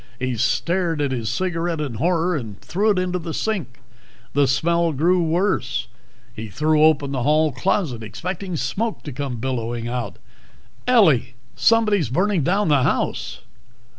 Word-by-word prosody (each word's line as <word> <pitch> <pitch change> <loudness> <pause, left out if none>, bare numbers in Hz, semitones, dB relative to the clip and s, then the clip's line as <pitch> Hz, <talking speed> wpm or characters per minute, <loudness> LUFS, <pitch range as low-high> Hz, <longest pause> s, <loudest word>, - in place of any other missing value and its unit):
He 130 -1 -2
stared 165 - 0
at 145 -2 0
his 115 -4 -2
cigarette 170 +3 -1
in 145 -5 -3
horror 170 +6 +1
and 110 -9 -6
threw 205 +5 0
it 205 - +2
into 180 0 -1
the 165 -2 -5
sink. 175 - -3 0.5
The 140 -1 +3
smell 170 +5 +1
grew 175 +6 +2
worse. 175 +4 0 0.5
He 110 +1 -6
threw 155 +8 +1
open 150 -3 +3
the 130 -2 -2
hall 155 +3 +3
closet, 135 - -1
expecting 175 - -5
smoke 195 - -2
to 145 - -6
come 135 -1 -4
billowing 120 -1 -3
out. 120 0 -4 0.7
"Ellie! 160 - +4 0.2
Somebody's 210 - +3
burning 185 - +1
down 195 +8 +1
the 145 -3 +4
house!" - - -1
155 Hz, 150 wpm, -22 LUFS, 125-180 Hz, 0.7 s, Ellie